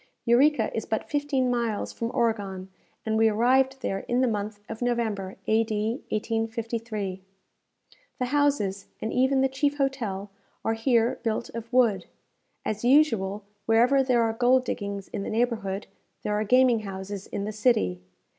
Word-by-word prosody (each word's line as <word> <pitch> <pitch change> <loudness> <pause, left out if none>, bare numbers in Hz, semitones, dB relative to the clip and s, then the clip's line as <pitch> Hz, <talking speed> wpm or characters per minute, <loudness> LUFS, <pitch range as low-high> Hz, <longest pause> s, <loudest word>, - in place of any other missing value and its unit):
Eureka 270 +6 +3
is - - -1
but - - -2
fifteen 285 -4 0
miles 235 -3 -1
from 230 - -3
Oregon, 200 -5 -1 0.4
and 220 0 0
we 225 0 +5
arrived 260 +4 +2
there 195 -5 -1
in 245 - +1
the 260 - +3
month 210 -1 -3
of 225 +1 -7
November, 220 -6 -1
A.D. 220 -1 +1 0.2
1853. 225 -3 -3 1.0
The 250 - -1
houses, 250 -8 +1
and 220 - -3
even 265 +1 +3
the 265 - +4
chief 285 +2 0
hotel, 225 -8 -2 0.3
are 225 - +2
here 230 0 +2
built 225 0 -2
of 230 +1 -7
wood. 230 -8 +3 0.6
As 215 - -3
usual, 225 -7 +3 0.2
wherever 240 +5 +4
there 250 -3 +3
are 225 -1 0
gold 250 +2 +3
diggings 200 -3 -4
in - - -4
the - - -4
neighbourhood, 220 -4 -1 0.4
there 210 - -1
are 210 +1 +1
gaming 250 +1 +4
houses 195 -1 -6
in 200 - -4
the 215 - -3
city. 210 - +1
225 Hz, 155 wpm, -26 LUFS, 205-250 Hz, 1.0 s, we